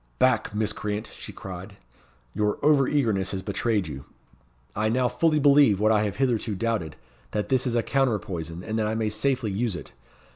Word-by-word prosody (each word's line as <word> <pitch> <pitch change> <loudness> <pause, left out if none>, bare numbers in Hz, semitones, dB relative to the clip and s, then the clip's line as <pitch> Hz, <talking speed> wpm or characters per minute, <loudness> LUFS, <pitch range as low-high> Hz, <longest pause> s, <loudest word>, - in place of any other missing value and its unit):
"Back, 120 -4 +2
miscreant!" 105 0 -2
she - - -9
cried; 95 +2 -9 0.6
"your 105 0 0
over 145 -3 +4
eagerness 110 -10 +1
has 95 -1 -3
betrayed 100 -1 0
you. 70 -2 -7 0.7
I 110 +1 +1
now 125 +2 +2
fully 155 +6 +2
believe 140 -8 +5
what 110 +1 +3
I 105 -1 +4
have 100 -3 -3
hitherto 120 -4 0
doubted, 100 -7 -2 0.4
that 105 - -2
this 130 -1 +2
is 120 - -1
a 115 - +2
counter 135 -4 +1
poison, 85 -2 -6
and 110 +2 -2
that 110 - +1
I 110 - -1
may 110 -1 0
safely 115 +1 -1
use 105 0 -1
it. - - -8
110 Hz, 185 wpm, -26 LUFS, 100-125 Hz, 0.7 s, believe